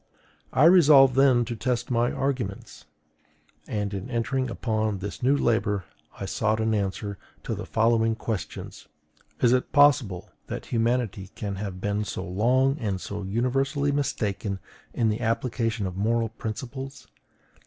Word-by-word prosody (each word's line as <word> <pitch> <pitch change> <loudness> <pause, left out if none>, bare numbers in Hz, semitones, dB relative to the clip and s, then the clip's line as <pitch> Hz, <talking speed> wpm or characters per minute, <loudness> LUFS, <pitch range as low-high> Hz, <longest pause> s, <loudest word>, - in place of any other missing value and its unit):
I 135 - +3
resolved 150 -6 +7
then 130 -2 +4
to 120 - -4
test 120 +1 -2
my 120 0 +2
arguments; 125 -8 -3 0.8
and 105 -1 -2
in 100 +5 -5
entering 130 +2 -1
upon 110 -3 -1
this 100 +2 -6
new 135 +3 +3
labor 105 -6 +1 0.3
I - - -3
sought 110 +3 0
an 110 0 +1
answer 100 0 -2 0.2
to - - -3
the - - -6
following 115 0 +2
questions: 110 -4 -5 0.5
Is 120 0 +5
it 130 - 0
possible 130 - +3 0.2
that - - -5
humanity 115 -5 -1
can 100 -2 -4
have 95 -2 -5
been 105 +2 -1
so 95 -2 -5
long 130 - +2
and 100 -6 -2
so 100 +2 -5
universally 135 +7 0
mistaken 105 -8 -1 0.3
in 115 -2 +1
the 105 - -2
application 115 -2 -1
of 90 -1 -4
moral 115 +2 +1
principles? 130 +5 -6
115 Hz, 145 wpm, -26 LUFS, 105-130 Hz, 0.8 s, resolved